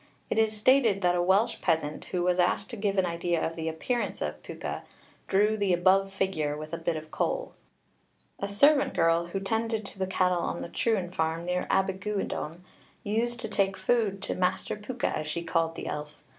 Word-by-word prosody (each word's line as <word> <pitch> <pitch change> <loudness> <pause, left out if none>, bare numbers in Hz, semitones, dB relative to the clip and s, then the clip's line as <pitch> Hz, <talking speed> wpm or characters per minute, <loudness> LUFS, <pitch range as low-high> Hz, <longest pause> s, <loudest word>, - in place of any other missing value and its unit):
It - - +2
is 220 -1 +2
stated 225 -3 +4
that 180 -1 +3
a 175 - +1
Welsh 190 +5 +2
peasant 160 -3 0
who 180 -1 -2
was 180 0 +2
asked 180 +7 +1
to - - -4
give 200 -2 -1
an 190 - +4
idea 170 0 0
of 165 - -3
the 160 -1 -2
appearance 235 +10 -2
of - - -4
Pwca, - - -5 0.5
drew 210 +3 +3
the 200 -3 +1
above 190 +2 +4
figure 170 -7 -1
with 155 +1 -8
a 165 - -2
bit 165 0 -1
of 155 0 -7
coal. - - -1 0.9
A 200 - -2
servant 275 +9 +4
girl 165 0 +3
who 175 - -4
attended 220 +2 -1
to 195 - -9
the 190 - 0
cattle 180 -1 +2
on 170 - -2
the - - -6
Trwyn 190 -5 0
farm, 165 0 -1
near 180 0 -1
Abergwyddon, 190 -3 -1 0.4
used 235 +3 0
to 225 - -3
take 195 -2 +1
food 195 0 +1
to - - -1
'Master 185 +2 0
Pwca,' 240 +4 -3
as 155 - -4
she 170 +3 -3
called 165 -1 0
the - - -6
elf. 150 0 -5
190 Hz, 200 wpm, -28 LUFS, 170-210 Hz, 0.9 s, stated